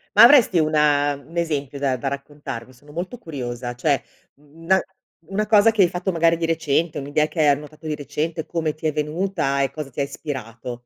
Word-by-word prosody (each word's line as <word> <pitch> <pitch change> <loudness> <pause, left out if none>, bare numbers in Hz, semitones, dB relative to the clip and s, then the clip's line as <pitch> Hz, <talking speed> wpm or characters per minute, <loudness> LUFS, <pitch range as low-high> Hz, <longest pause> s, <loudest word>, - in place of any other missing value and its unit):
Ma 215 - +9
avresti 235 - +7
una 150 -2 +3
u 140 0 -15
un 170 - -9
esempio 145 -4 -2
da 135 -2 0
da 135 +3 -4
raccontarmi? 140 -3 -6
Sono 145 +4 -18
molto 180 +9 -5
curiosa, 125 - -5
cioè, 140 +1 +1 0.3
mhmm, 150 +3 -20
n - - -11
na 190 0 +4 0.5
una 210 +2 -1
cosa 215 +1 +6
che 215 -3 +2
hai 175 - +5
fatto 180 +2 -2
magari 165 -1 +3
di 165 - -1
recente, 160 -1 0
un'idea 145 +2 0
che 165 - -7
hai 155 - +5
annotato 150 +2 -1
di 150 - -1
recente, 150 +3 -3
come 160 -3 -2
ti 155 - -10
è 155 - +1
venuta 150 -2 -1
e 135 -1 0
cosa 150 -1 -6
ti 135 - -9
ispirato. 125 -4 -5
150 Hz, 210 wpm, -22 LUFS, 140-165 Hz, 0.5 s, Ma